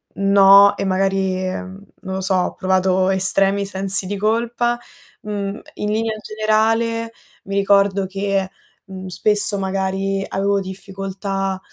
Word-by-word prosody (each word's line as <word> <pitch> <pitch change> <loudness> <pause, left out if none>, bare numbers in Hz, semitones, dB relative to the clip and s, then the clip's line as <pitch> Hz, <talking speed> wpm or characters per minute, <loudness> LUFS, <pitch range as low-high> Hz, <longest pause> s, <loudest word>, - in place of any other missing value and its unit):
no, 200 0 +6
e - - -2
magari, 190 0 0
mhmm, 190 +1 -7 0.2
non 190 -1 -5
lo 190 - -3
so, 190 0 0
ho 180 - 0
provato 185 0 +1
estremi 195 +1 +2
sensi 195 0 +1
di 200 +2 -4
colpa, 235 +3 0 0.4
uhm, 205 0 -4 0.2
in 210 - -3
linea 220 0 -1
generale 225 +2 0 0.3
mi 195 - -5
ricordo 200 0 +2
che, 195 0 -2 0.4
uhm, 190 -1 -9
spesso 205 +3 +1
magari 195 0 -2
avevo 200 +1 0
difficoltà 195 0 -5
195 Hz, 130 wpm, -19 LUFS, 190-205 Hz, 0.4 s, no